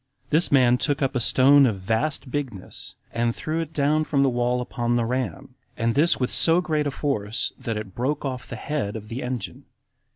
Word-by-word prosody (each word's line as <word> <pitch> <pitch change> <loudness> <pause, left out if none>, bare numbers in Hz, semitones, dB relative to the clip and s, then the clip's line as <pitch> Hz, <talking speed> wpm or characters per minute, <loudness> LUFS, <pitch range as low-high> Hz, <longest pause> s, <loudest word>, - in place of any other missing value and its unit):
This 160 +3 +2
man 125 -3 +5
took 145 -2 0
up 135 - 0
a - - +2
stone 135 +3 +5
of 110 - 0
a - - -10
vast 115 +8 -1
bigness, 125 -10 -5 0.2
and 115 0 0
threw 155 +1 -3
it 160 -1 -6
down 150 +1 +2
from 140 -3 +1
the 135 - +3
wall 120 +1 0
upon 120 -1 -1
the 120 -1 +1
ram, 125 -6 -3 0.2
and 115 0 +1
this 155 +6 +3
with 125 -1 -1
so 165 +1 +4
great 155 -4 0
a - - -1
force, 115 -7 -2
that 115 -2 -3
it 105 -3 -7
broke 140 +6 -2
off 130 -2 -4
the - - -6
head 140 -9 -3
of 105 -1 -8
the 120 +3 -4
engine. 125 -4 -5
130 Hz, 215 wpm, -24 LUFS, 115-145 Hz, 0.2 s, man